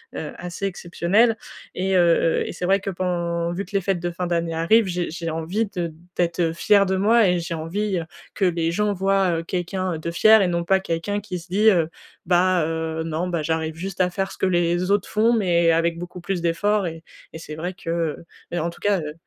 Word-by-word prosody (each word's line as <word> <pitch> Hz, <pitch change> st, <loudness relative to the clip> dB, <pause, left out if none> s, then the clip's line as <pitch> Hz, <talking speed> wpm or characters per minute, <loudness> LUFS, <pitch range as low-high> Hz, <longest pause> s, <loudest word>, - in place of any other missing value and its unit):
heu, -, -, -5 dB
assez 180 Hz, +2 st, -5 dB
exceptionnelle 195 Hz, +5 st, +1 dB, 0.4 s
et 190 Hz, +1 st, 0 dB
heu 170 Hz, -2 st, +3 dB
et -, -, -4 dB
c'est 180 Hz, -, -4 dB
vrai 195 Hz, +2 st, +3 dB
que 200 Hz, -, -5 dB
pen 170 Hz, -2 st, -2 dB
vu 195 Hz, +3 st, -4 dB
que 185 Hz, -, -17 dB
les 195 Hz, -, +3 dB
fêtes 190 Hz, -1 st, 0 dB
de 175 Hz, +1 st, -2 dB
fin 180 Hz, +1 st, -4 dB
d'année 170 Hz, -1 st, -1 dB
arrivent, 195 Hz, +7 st, +3 dB
j'ai 175 Hz, -1 st, -2 dB
j'ai 165 Hz, 0 st, -4 dB
envie 165 Hz, +7 st, -1 dB
de 170 Hz, -2 st, -2 dB, 0.2 s
d'être, 170 Hz, 0 st, 0 dB
heu, 165 Hz, -2 st, +2 dB
fière 200 Hz, +4 st, +4 dB
de 190 Hz, -, +1 dB
moi 215 Hz, +3 st, +4 dB
et 180 Hz, 0 st, +1 dB
j'ai 170 Hz, +1 st, -4 dB
envie, 185 Hz, +5 st, -2 dB
heu, 165 Hz, -, -5 dB, 0.3 s
que 195 Hz, -, 0 dB
les 165 Hz, -2 st, +1 dB
gens 210 Hz, +3 st, 0 dB
voient, 195 Hz, -2 st, +1 dB
heu, -, -, -5 dB
quelqu'un 180 Hz, 0 st, -2 dB
de 160 Hz, +2 st, -4 dB
fier 215 Hz, +5 st, +6 dB
et 190 Hz, -, +2 dB
non 170 Hz, -1 st, -1 dB
pas 190 Hz, +3 st, +3 dB
quelqu'un 190 Hz, +3 st, -2 dB
qui 205 Hz, -3 st, -5 dB
se 170 Hz, -, -14 dB
dit, 210 Hz, +4 st, +4 dB
heu: 170 Hz, -6 st, +2 dB, 0.4 s
«Bah, 180 Hz, 0 st, +3 dB
heu, 160 Hz, 0 st, -2 dB
non, 165 Hz, +2 st, -2 dB
bah, 170 Hz, -3 st, -2 dB
j'arrive 160 Hz, 0 st, -1 dB
juste 185 Hz, +2 st, -4 dB
à 180 Hz, -, +3 dB
faire 195 Hz, +1 st, -3 dB
ce -, -, -10 dB
que -, -, 0 dB
les 175 Hz, 0 st, +1 dB
autres 200 Hz, -1 st, +2 dB
font 225 Hz, +2 st, +2 dB
mais 170 Hz, -6 st, +3 dB
avec 165 Hz, +1 st, +1 dB
beaucoup 175 Hz, +1 st, -8 dB
plus 180 Hz, 0 st, -2 dB
d'efforts» 195 Hz, +4 st, +1 dB
et 165 Hz, -1 st, -7 dB, 0.3 s
et -, -, -6 dB
c'est 155 Hz, -2 st, -8 dB
vrai 175 Hz, +4 st, -4 dB
que, 180 Hz, -2 st, -9 dB
heu, 165 Hz, -1 st, -2 dB, 0.3 s
mais 175 Hz, -, -2 dB
en 170 Hz, -, -1 dB
tout -, -, -16 dB
cas, 205 Hz, -2 st, +2 dB
heu, 150 Hz, -1 st, -5 dB
175 Hz, 235 wpm, -23 LUFS, 165-195 Hz, 0.4 s, fier